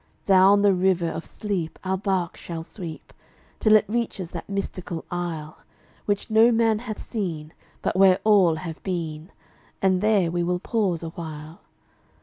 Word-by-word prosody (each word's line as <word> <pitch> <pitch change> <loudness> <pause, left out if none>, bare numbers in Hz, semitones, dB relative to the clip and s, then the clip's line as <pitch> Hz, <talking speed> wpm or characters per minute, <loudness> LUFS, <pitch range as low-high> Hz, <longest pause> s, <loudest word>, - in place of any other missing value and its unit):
Down 195 +1 +6
the 200 -1 +5
river 180 -2 +1
of 165 0 -6
sleep 190 -7 -4
our 190 0 0
barque 190 -3 -1
shall 165 -2 -6
sweep, 165 -3 -9 0.5
Till 215 -1 +5
it 215 - +5
reaches 210 -5 -3
that 170 +1 -7
mystical 185 -4 -4
Isle 165 -3 -4 0.5
Which 205 -1 -1
no 225 +2 +6
man 225 -2 +2
hath 220 -2 -6
seen, 165 -9 -4 0.3
but - - 0
where 190 -1 +6
all 195 -6 +5
have 160 0 -7
been, 165 -2 -4 0.5
And 185 -1 +2
there 205 -5 +2
we 175 0 -1
will 180 +1 0
pause 185 -4 -1
awhile. 160 -1 -8
185 Hz, 150 wpm, -24 LUFS, 165-205 Hz, 0.5 s, Down